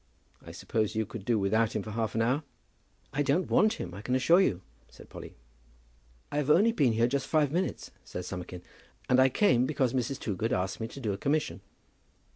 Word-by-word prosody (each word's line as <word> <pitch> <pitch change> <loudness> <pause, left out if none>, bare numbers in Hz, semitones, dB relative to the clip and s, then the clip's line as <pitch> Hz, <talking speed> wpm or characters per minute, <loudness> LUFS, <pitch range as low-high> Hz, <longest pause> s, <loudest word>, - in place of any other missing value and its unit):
I - - -11
suppose 110 -2 -2
you 110 0 0
could 100 -1 -9
do 115 0 +2
without 105 +2 +1
him 105 - -1
for 110 - -7
half 110 0 -2
an 115 - +2
hour." 130 +6 +1 0.7
"I 145 - 0
don't 145 +6 +1
want 215 +1 +4
him, 90 - -6
I 100 - -8
can 125 +4 -1
assure 165 +8 +5
you," 95 - 0 0.3
said - - -15
Polly. - - -10 1.0
"I 145 - -2
have 150 -1 0
only 205 +9 +5
been 140 - +2
here 115 +1 +3
just 135 +2 -1
five 150 -3 +2
minutes," 180 +4 -2
said 90 - -7
Summerkin, 90 -1 -7 0.4
"and 130 - +4
I 130 0 +6
came 125 - +3
because 130 -4 0
Mrs. 130 +1 -1
Toogood 110 +3 -2
asked 95 -2 -2
me 110 - -3
to 130 - -10
do 110 -6 -2
a 95 - -6
commission." 145 -6 -1
120 Hz, 210 wpm, -29 LUFS, 110-145 Hz, 1.0 s, I